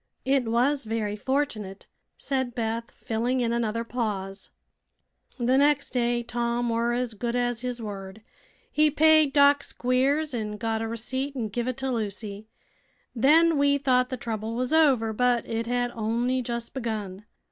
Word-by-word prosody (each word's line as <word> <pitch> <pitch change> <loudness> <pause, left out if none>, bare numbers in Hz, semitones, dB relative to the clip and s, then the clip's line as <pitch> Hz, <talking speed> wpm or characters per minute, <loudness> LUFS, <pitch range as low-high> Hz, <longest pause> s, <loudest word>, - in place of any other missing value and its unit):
"It 265 -1 +2
was 245 +4 +1
very 215 -2 -2
fortunate," 215 -6 -2 0.3
said 260 -3 -2
Beth, 230 0 -2
filling 240 +3 -2
in 235 -1 0
another 230 -1 -1
pause. 205 -5 -4 0.9
"The 255 +1 +2
nex' 290 0 +2
day 240 -1 0
Tom 235 0 -1
were 230 +1 +1
as 245 -1 -2
good 235 +3 -3
as 245 -1 0
his 250 -1 -3
word. 200 -1 -7 0.5
He 305 0 +4
paid 310 0 +5
Doc 285 0 +5
Squiers 270 +4 0
an' 210 -3 -3
got 225 0 -2
a 225 - -2
receipt 260 +5 -3
an' 230 -5 -2
giv 240 +4 -3
it 255 - -2
to 265 -1 -2
Lucy. 210 -2 -4 0.7
Then 310 +5 +4
we 285 0 +4
thought 255 -2 +2
th' 255 - -4
trouble 225 -1 -4
was 255 +4 -1
over, 265 -9 +4
but 245 +1 +1
it 230 0 -2
had 245 0 0
on'y 235 +3 -1
just 235 -1 -4
begun. 215 -6 -4
240 Hz, 160 wpm, -26 LUFS, 225-260 Hz, 0.9 s, paid